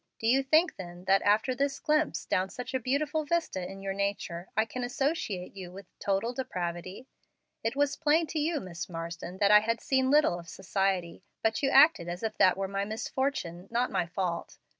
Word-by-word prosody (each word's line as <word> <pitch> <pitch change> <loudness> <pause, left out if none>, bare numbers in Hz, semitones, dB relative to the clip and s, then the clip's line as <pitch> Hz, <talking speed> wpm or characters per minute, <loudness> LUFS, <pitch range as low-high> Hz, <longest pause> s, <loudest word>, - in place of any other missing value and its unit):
Do - - -6
you 255 +4 +4
think 310 +6 +3
then, 175 -1 -9
that, 195 +1 +4
after 210 +5 +3
this 275 +2 -1
glimpse 305 0 0
down 185 +1 0
such 250 +3 -7
a 260 - +1
beautiful 290 +5 0
vista 315 - -1
in 195 0 -10
your 195 0 -2
nature, 195 -3 -3
I 220 - +4
can 250 +3 -5
associate 245 - -2
you 185 -2 -8
with 195 +2 -10
'total 200 +5 0
depravity'? 185 -2 -4 0.6
It 225 +2 -1
was 285 0 +1
plain 320 +1 +3
to 310 +1 -3
you, 310 +1 0
Miss 175 -4 -7
Marsden, 170 +1 -6
that 200 +1 +4
I 210 - +9
had 230 +2 -1
seen 265 -1 +1
little 290 -11 +4
of 170 -1 -11
society, 190 -2 -1 0.2
but 225 0 +1
you 275 - +2
acted 275 - +6
as 175 +3 -5
if 220 - -2
that 185 0 +5
were 195 0 -1
my 195 +1 -2
misfortune, 215 -4 -3
not 240 +2 0
my 175 - 0
fault. 180 -1 -3
210 Hz, 200 wpm, -29 LUFS, 185-270 Hz, 0.6 s, I